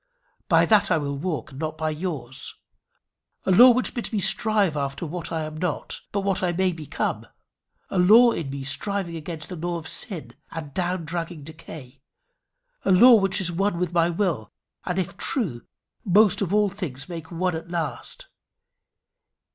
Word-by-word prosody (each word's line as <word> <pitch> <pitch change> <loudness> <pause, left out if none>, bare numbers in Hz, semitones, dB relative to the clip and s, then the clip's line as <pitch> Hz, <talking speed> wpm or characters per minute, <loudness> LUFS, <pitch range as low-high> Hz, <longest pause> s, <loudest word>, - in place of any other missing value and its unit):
By - - +5
that 215 -2 +4
I 165 - +3
will 140 -2 -3
walk, 150 -4 -4
and 135 - -10
not 155 0 -3
by 155 0 -1
yours 150 -6 -3 0.9
a - - +2
law 240 +7 +9
which 250 +1 +2
bids 240 - -5
me 220 - -1
strive 200 -2 +2
after 140 +2 -3
what 170 +1 -5
I 160 -1 -2
am 155 0 -6
not 165 -2 -3
but 195 -1 0 0.2
may 190 -1 +2
become 160 -4 -4 0.6
a 190 - 0
law 225 +7 +7
in 160 -10 -4
me 135 0 -5
striving 180 +5 -2
against 160 0 -6
the 180 - -5
law 175 +1 -3
of 160 -1 -8
sin 160 - -2 0.2
and 155 -4 -7
down 180 -2 -2
dragging 165 -1 -5
decay 145 -4 -11 0.8
a - - +2
law 240 +7 +8
which 195 -4 +3
is 180 -2 0
one 195 +1 0
with 175 -1 -2
my 170 0 +3
will, 170 - -1 0.3
and, 180 0 -2
if 185 0 -2
true, 165 - -2 0.4
must 205 +1 +4
of 190 -3 -1
all 210 0 +3
things 155 -9 -6
make 165 -2 -7
one 180 0 -1
at 165 +1 -7
last. 160 -8 -4
170 Hz, 170 wpm, -24 LUFS, 155-195 Hz, 0.9 s, law